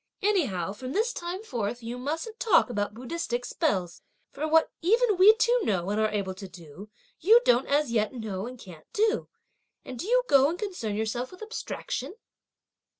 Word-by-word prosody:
Anyhow, 235 - +1
from 255 +4 -7
this 455 +4 +1
time 350 +4 -5
forth 235 - -4
you 240 +2 -5
mustn't 325 - -4
talk 420 - +4
about 205 -2 -2
Buddhistic 245 -1 -3
spells, 185 - -1 0.3
for 310 - -3
what 320 +1 +3
even 440 +5 +3
we 395 +4 +7
two 480 +2 +3
know 190 -2 0
and 210 +1 0
are 215 - +2
able 200 -3 -2
to 190 +1 -9
do, 180 +3 -12 0.3
you 435 +8 +7
don't 245 +2 +3
as 285 -2 +1
yet 215 -2 +1
know 220 -4 -5
and 250 +1 -9
can't 170 -7 -13
do; 440 +2 +1 0.6
and 255 - -8
do 370 - -4
you - - +3
go 275 0 +5
and 340 - -3
concern 360 - -4
yourself 220 +4 -2
with 365 +3 -11
abstraction?" 435 -2 -5
255 Hz, 180 wpm, -27 LUFS, -, 0.6 s, we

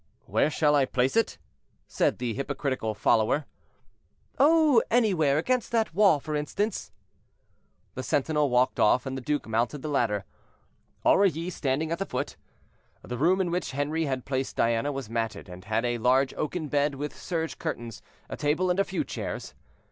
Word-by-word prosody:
"Where - - +2
shall 150 -1 +2
I 140 -2 +4
place 130 0 0
it?" 225 -1 +1 0.5
said - - +1
the 120 -2 -2
hypocritical 135 -4 -2
follower. 110 +7 +2 0.9
"Oh, 300 -4 +5
anywhere; 185 - +3
against 250 +10 0
that 225 -6 +1
wall, 195 -5 +5
for 150 +2 -4
instance." 185 +8 -2 1.0
The 130 - -4
sentinel 145 +3 +1
walked 125 +1 +2
off, 125 +5 +4
and 135 0 -4
the 130 - -5
duke 150 +3 -1
mounted 120 +5 -1
the 155 - -3
ladder, 110 -8 0 0.8
Aurilly 180 -3 +3
standing 150 0 -1
at 170 - -1
the 195 - -2
foot. - - -3 0.7
The 125 - -5
room 180 +6 +3
in 180 -3 0
which 175 -5 -2
Henri 150 +4 -1
had 130 -3 -3
placed 135 -1 -2
Diana 115 +5 +1
was 135 -4 -5
matted, 115 -3 -3
and 90 +1 -11
had 110 +3 0
a 120 -1 -1
large 130 +3 +3
oaken 155 +1 -3
bed 145 0 +1
with 145 +1 -5
serge 160 -5 -4
curtains, 115 -3 -5 0.3
a - - -5
table, 155 +5 +1
and 180 - 0
a - - +5
few 190 -2 -2
chairs. - - -6
145 Hz, 170 wpm, -27 LUFS, 125-170 Hz, 1.0 s, Oh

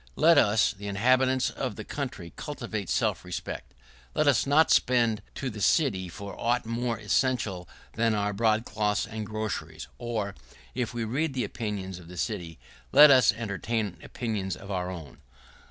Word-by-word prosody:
Let 165 -2 +6
us, 105 -1 +3
the 100 -1 -8
inhabitants 130 +5 +2
of - - -4
the - - -6
country, 85 -1 -5
cultivate 115 - -5
self - - 0
respect. - - -6 0.4
Let 155 - +2
us 140 -1 +3
not 155 +3 +5
send 120 -4 +3
to 130 -2 -3
the 105 -1 -8
city 100 - +2
for 100 +2 -8
aught 120 +1 +1
more 115 0 -2
essential 105 -4 0 0.2
than 115 -1 +1
our 105 0 0
broadcloths 110 -1 +1
and 110 -1 -6
groceries; 105 -8 -4
or, 110 -4 -3 0.4
if 125 -2 -2
we 120 - -1
read 135 +6 -1
the 125 - 0
opinions 100 -5 -4
of 85 - -13
the 90 +1 -10
city, 90 -8 -3 0.3
let 150 0 +9
us 130 -4 +6
entertain 105 -3 -3
opinions 105 -6 -3
of 100 +2 -10
our 90 -1 -2
own. 85 -7 -9
110 Hz, 160 wpm, -28 LUFS, 100-120 Hz, 0.4 s, let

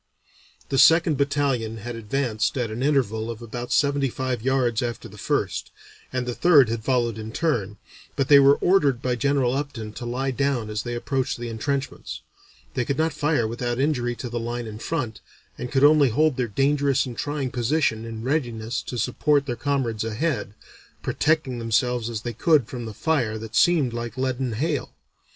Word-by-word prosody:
The 135 - +1
second 165 +3 +6
battalion 140 -6 0
had 120 +2 -6
advanced 115 0 -1
at 120 -3 -1
an 115 +3 -4
interval 120 -6 +1
of 115 -2 -5
about 120 +1 -6
seventy 140 -1 +2
five 130 -2 -3
yards 125 -3 +1
after 120 -1 -4
the 105 - -14
first, - - -1 0.4
and 130 -1 -2
the 125 - -2
third 145 -5 +5
had 115 -1 -3
followed 120 -3 0
in 110 0 -6
turn, 115 - -1 0.4
but 135 - 0
they 140 0 +8
were 140 +1 +6
ordered 145 -9 +3
by 125 0 -1
General 135 -1 +1
Upton 135 -7 -4
to 120 +1 -6
lie 130 +3 -1
down 130 -5 -1
as 105 0 -2
they 120 -1 -4
approached 130 +2 -1
the 120 0 -5
entrenchments. 140 +5 -3 0.5
They 125 - 0
could 135 +3 -2
not 160 0 +1
fire 150 -6 +1
without 120 +1 -3
injury 125 -4 0
to 125 - -6
the 120 0 -3
line 120 +1 -4
in 110 -1 -8
front, 120 -6 -3 0.3
and 125 0 -6
could 135 0 +2
only 145 -2 +6
hold 150 +4 +2
their 125 -2 -1
dangerous 140 +4 +2
and 125 -2 -6
trying 145 0 -3
position 120 -2 0
in 115 -1 -6
readiness 120 -4 -1
to 125 - -6
support 140 +5 +1
their 120 -4 -2
comrades 120 -4 -1
ahead, 115 -2 -2 0.5
protecting 150 -5 0
themselves 120 +1 0
as 110 -2 -4
they 120 - -3
could 150 +2 +3
from 120 -1 -6
the 110 - -8
fire 120 -5 0
that 110 0 -8
seemed 155 -9 +3
like 120 0 -5
leaden 130 -2 -1
hail. 145 +4 -2
125 Hz, 185 wpm, -24 LUFS, 115-140 Hz, 0.5 s, they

